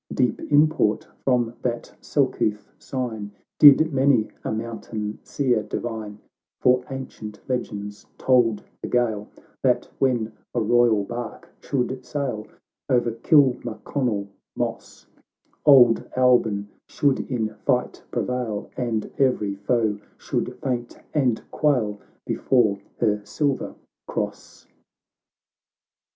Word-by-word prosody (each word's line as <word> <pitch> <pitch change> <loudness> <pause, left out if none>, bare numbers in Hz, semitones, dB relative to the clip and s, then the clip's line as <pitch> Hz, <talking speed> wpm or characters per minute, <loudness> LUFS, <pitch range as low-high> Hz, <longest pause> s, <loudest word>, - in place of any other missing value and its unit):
Deep 125 -3 +1
import 150 -7 +3 0.2
from 120 -3 +2
that 120 -1 -3
selcouth' 105 -1 0
sign, 115 -6 -4 0.3
Did 155 +2 +8
many 130 -5 +3
a - - -2
mountain 110 -1 -4
Seer 125 -6 +1
divine, 105 -1 -5 0.4
For 125 0 +4
ancient 110 -6 -7
legends 105 -5 -4
told 120 -5 +3 0.2
the - - -4
Gael, 110 -4 0 0.3
That - - +2
when 120 -5 +1 0.2
a - - +2
royal 115 -1 +3
bark 120 +2 -6
should 130 -1 -2
sail 125 -8 -3 0.4
O'er 120 -2 +2
Kilmaconnel 125 -3 +1 0.3
moss, - - -4 0.6
Old 125 -5 +7
Albyn 120 -5 +3 0.2
should 140 -2 +1
in 110 -4 0
fight 125 -3 0
prevail, 125 -5 -2
And 115 -4 -1
every 125 -7 +2
foe 105 +1 0 0.2
should - - -3
faint 120 -2 -2 0.2
and 130 -7 +1
quail 120 -9 +1 0.3
Before 110 -6 +2 0.2
her 105 -3 +1
silver 140 +6 -1 0.3
Cross. - - -5
120 Hz, 105 wpm, -24 LUFS, 110-130 Hz, 0.6 s, Did